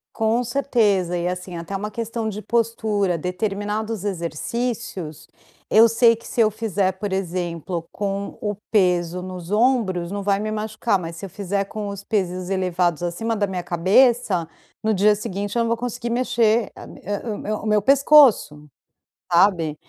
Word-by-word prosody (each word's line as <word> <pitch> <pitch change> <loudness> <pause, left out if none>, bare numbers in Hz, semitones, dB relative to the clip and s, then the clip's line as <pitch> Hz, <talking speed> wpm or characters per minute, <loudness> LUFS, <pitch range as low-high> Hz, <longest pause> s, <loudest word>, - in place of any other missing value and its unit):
Com 225 +2 +1
certeza, 215 -9 +1
e 170 - -2
assim 180 0 -5
até 170 +3 -7
uma 210 +2 -3
questão 230 +1 -4
de 210 0 -4
postura, 215 -6 0
determinados 205 +4 -3
exercícios, 190 - -4 0.4
eu 225 +2 +7
sei 230 0 +4
que 230 - -13
se 235 - 0
eu 215 -1 +4
fizer, 200 -3 0
por 195 0 -4
exemplo, 175 -2 -3
com 200 0 -3
o 210 -1 -1 0.2
peso 180 -3 +2
nos 180 0 -8
ombros 210 -7 +1
não 200 0 -3
vai 200 0 +1
me 215 +1 -3
machucar, 215 -1 -1
mas 165 -1 -6
se 180 - -7
eu - - -8
fizer 200 +1 -2
com 210 +1 -6
os 200 0 -6
pesos 185 -3 -2
elevados 180 -3 0
acima 215 +6 -2
da 205 -1 +1
minha 180 -2 -4
cabeça, 185 0 +2 0.3
no 220 0 +2
dia 210 +2 +4
seguinte 205 +1 -4
eu - - +3
não 230 - -1
vou 230 - +1
conseguir 240 0 -4
mexer 235 -2 +1
a - - -10
mi - - -13
o 205 +2 -4
o - - -7
me 215 - -5
o 215 - -5
meu 210 -1 +3
pescoço, 265 - +5 0.6
sabe. 170 -4 +3
200 Hz, 170 wpm, -22 LUFS, 180-225 Hz, 0.6 s, eu